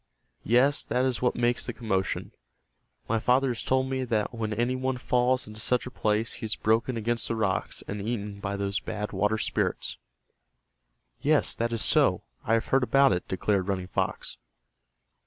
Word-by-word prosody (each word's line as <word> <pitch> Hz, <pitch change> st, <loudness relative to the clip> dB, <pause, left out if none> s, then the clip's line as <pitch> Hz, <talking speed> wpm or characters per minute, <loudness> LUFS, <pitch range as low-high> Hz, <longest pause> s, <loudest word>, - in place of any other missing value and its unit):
Yes, 130 Hz, +6 st, +3 dB
that 125 Hz, +3 st, +1 dB
is 130 Hz, -3 st, -1 dB
what 125 Hz, -, +2 dB
makes 120 Hz, 0 st, +1 dB
the 120 Hz, -, -3 dB
commotion. 110 Hz, -5 st, -2 dB, 0.8 s
My 115 Hz, 0 st, +1 dB
father 130 Hz, +4 st, +3 dB
has 120 Hz, -2 st, -2 dB
told 130 Hz, 0 st, +1 dB
me 130 Hz, 0 st, -1 dB
that 110 Hz, -3 st, 0 dB
when 110 Hz, -2 st, -3 dB
any 120 Hz, +4 st, 0 dB
one 130 Hz, 0 st, -1 dB
falls 125 Hz, 0 st, +1 dB
into 105 Hz, +1 st, -10 dB
such 125 Hz, +2 st, +1 dB
a 125 Hz, -, -7 dB
place 110 Hz, -2 st, 0 dB
he 120 Hz, -, -6 dB
is 110 Hz, -, -1 dB
broken 115 Hz, +3 st, +1 dB
against 115 Hz, +1 st, -1 dB
the 115 Hz, -, -1 dB
rocks, 105 Hz, -4 st, -1 dB
and 105 Hz, 0 st, -4 dB
eaten 105 Hz, -2 st, -3 dB
by 100 Hz, 0 st, -3 dB
those 100 Hz, 0 st, -1 dB
Bad 105 Hz, 0 st, -4 dB
Water 105 Hz, +1 st, +1 dB
Spirits." -, -, -1 dB, 1.2 s
"Yes, -, -, +3 dB
that 115 Hz, +1 st, -1 dB
is 115 Hz, -3 st, -1 dB
so, -, -, +4 dB, 0.2 s
I 115 Hz, -, +2 dB
have 115 Hz, -, 0 dB
heard 135 Hz, -, +4 dB
about 135 Hz, +2 st, +4 dB
it," 90 Hz, -, -3 dB
declared 95 Hz, 0 st, 0 dB
Running 95 Hz, -2 st, -2 dB
Fox. -, -, -2 dB
115 Hz, 180 wpm, -27 LUFS, 105-125 Hz, 1.2 s, so